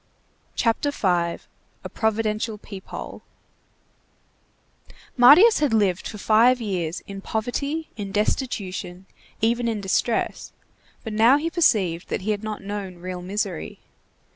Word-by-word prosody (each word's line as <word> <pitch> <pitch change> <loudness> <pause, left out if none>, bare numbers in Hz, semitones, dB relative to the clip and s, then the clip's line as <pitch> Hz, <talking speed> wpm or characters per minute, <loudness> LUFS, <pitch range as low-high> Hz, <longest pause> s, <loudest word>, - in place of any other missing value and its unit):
CHAPTER 230 +5 +1
V—A 175 -9 -3
PROVIDENTIAL 220 0 -1
PEEP 195 -2 -11
HOLE - - -7 1.9
Marius 300 - +7
had 285 -7 +2
lived 195 -4 +1
for 210 - -7
five 230 +5 +4
years 180 -7 -3
in 195 -1 -9
poverty, 280 +10 -3
in 200 -3 -6
destitution, 195 -4 -2 0.4
even 235 +2 +1
in 225 -2 -1
distress, 200 +4 -1 0.5
but 220 - -5
he - - -4
now 240 +5 +6
perceived 200 - +1
that - - -2
he 210 +3 -1
had 210 0 -3
not 215 -2 -5
known 195 -2 -5
real 180 +1 -6
misery. 200 +4 -4
215 Hz, 120 wpm, -23 LUFS, 190-235 Hz, 1.9 s, Marius